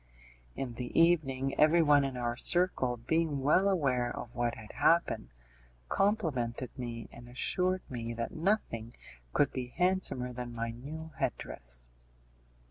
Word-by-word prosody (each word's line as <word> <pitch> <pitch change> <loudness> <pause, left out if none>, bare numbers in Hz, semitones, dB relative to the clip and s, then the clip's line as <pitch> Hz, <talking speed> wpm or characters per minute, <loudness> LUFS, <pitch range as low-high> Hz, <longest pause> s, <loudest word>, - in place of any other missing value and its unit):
In 125 -3 -3
the 120 +4 -2
evening 135 -6 +3
everyone 155 -2 +6
in 135 -2 -3
our 120 -1 -1
circle, 130 -5 +3
being 155 +3 0
well 180 +8 +4
aware 130 -10 +1
of 120 - -7
what 120 -1 -1
had 110 -2 -10
happened, 145 - +2 0.6
complimented 130 - 0
me, 120 -3 -5
and 120 0 -12
assured 185 +9 0
me 115 -2 -4
that 115 0 -3
nothing 160 - -1 0.4
could 140 - +2
be 130 -2 -3
handsomer 180 -9 +1
than 120 -1 -6
my 115 0 -2
new 155 +7 -8
head - - 0
dress. - - -7
130 Hz, 135 wpm, -31 LUFS, 120-165 Hz, 0.6 s, everyone